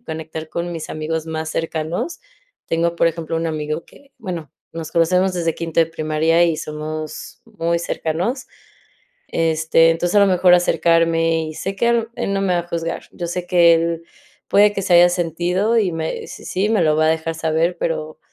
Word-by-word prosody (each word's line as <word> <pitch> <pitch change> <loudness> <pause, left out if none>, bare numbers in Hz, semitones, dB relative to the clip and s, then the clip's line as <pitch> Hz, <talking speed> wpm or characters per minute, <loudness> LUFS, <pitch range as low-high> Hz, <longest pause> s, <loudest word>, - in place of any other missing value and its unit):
conectar 160 -5 -7
con 170 +2 -4
mis 160 -2 -6
amigos 155 +1 -3
más 160 0 -4
cercanos. 165 - -3 0.5
Tengo, 170 +1 0
por 170 - +3
ejemplo, 165 0 -2
un 165 0 -1
amigo 155 0 -3
que, 280 -1 -21
bueno, 175 -7 -6 0.2
nos 160 -1 -7
conocemos 180 +3 +2
desde 165 -2 -1
quinto 165 -1 -1
de 165 - +4
primaria 160 +1 +1
y 165 -2 +1
somos 155 0 -6
muy 170 -7 -2
cercanos, 175 - -2 0.8
este, 165 0 +3
entonces, 175 +4 0
a 205 - +7
lo 200 - +6
mejor 180 -1 +5
acercarme, 165 -2 +2
y 155 - -6
sé 195 +4 -4
que 235 +4 +1
a 235 - +4
lo 230 -1 0
él 195 - -2
no 195 - 0
me 185 -2 +1
va 175 - +2
a 175 - -12
juzgar, 165 0 -3
yo 175 - -5
sé 175 +1 -4
que 170 -2 +6
él 165 0 -1 0.5
puede 205 +1 +5
que 200 - -3
se 185 -2 +2
haya 175 +1 +8
sentido 175 +5 0
y 195 -6 +1
me 160 0 -4
si - - -10
sí, 195 +3 0
me 220 - +2
lo 155 -1 +3
va 155 0 +3
a - - +3
dejar 160 0 0
saber, 165 +2 0
pero 155 -2 -3
165 Hz, 195 wpm, -20 LUFS, 160-180 Hz, 0.8 s, haya